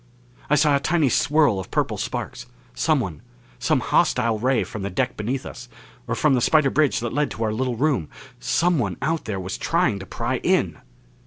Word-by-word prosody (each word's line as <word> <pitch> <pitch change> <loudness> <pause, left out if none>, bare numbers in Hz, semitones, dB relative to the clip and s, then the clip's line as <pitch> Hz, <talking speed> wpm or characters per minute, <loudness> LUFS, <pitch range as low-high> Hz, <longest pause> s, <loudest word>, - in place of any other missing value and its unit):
I 150 - +4
saw 150 -1 +4
a - - +2
tiny 155 -1 +2
swirl 145 -7 +3
of 95 - -7
purple - - 0
sparks. - - -5 0.3
Someone - - 0 0.4
some - - +1
hostile 110 -1 +2
ray 130 +3 +2
from 110 - -7
the 100 - -3
deck 125 +7 -1
beneath 125 +5 -3
us, 125 -1 -9 0.4
or 115 - -1
from 150 +3 +3
the 125 - +2
spider 150 +1 +3
bridge 150 -6 +2
that 120 - -3
led 145 +2 +1
to 115 - -4
our 110 -1 0
little 125 +2 -1
room 130 - 0 0.3
someone 160 +3 +1
out 160 +3 -1
there 105 -3 -3
was 95 +1 -5
trying 165 - +1
to 95 - -9
pry - - -2
in! - - +1
130 Hz, 190 wpm, -23 LUFS, 110-150 Hz, 0.4 s, I